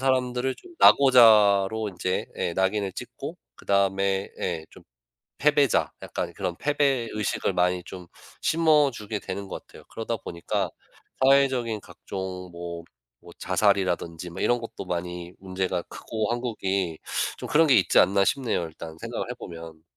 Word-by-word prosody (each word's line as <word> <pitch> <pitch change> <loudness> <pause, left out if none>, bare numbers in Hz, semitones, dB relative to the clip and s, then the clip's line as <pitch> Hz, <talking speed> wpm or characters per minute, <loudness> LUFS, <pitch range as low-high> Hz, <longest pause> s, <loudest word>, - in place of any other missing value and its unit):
사람들을 130 -1 0
좀 350 -1 -16
낙오자로 110 -5 +6
인제 90 +1 -2
예 85 - -2
낙인을 95 +1 +1
찍고 - - -7 0.2
그다음에 100 0 +1
예 85 -3 -2
좀 - - -16 0.6
패배자, 145 -3 +3
약간 - - -4
그런 90 - -3
패배 140 -5 +1
의식을 105 -1 -1
많이 90 0 +1
좀 90 -2 -9 0.4
심어주게 145 -10 +2
되는 100 +1 -6
것 - - -7
같아요. - - -15
그러다 115 +1 -3
보니까 85 -2 -3 0.5
사회적인 130 -5 +3
각종 95 -2 -7
뭐 85 -1 -7 0.4
뭐 - - -14
자살이라든지 90 -4 0
뭐 90 - -8
이런 120 0 +2
것도 115 -4 -7
많이 90 0 -4
문제가 95 -1 -2
크고 110 +3 -4
한국이 100 -8 -2 0.4
좀 - - -7
그런 160 +2 +5
게 140 - +5
있지 90 - +4
않나 100 0 +5
싶네요, 125 -8 0
일단 80 0 -10
생각을 - - -5
해보면. 80 -2 -10
100 Hz, 305 characters per minute, -26 LUFS, 90-120 Hz, 0.6 s, 낙오자로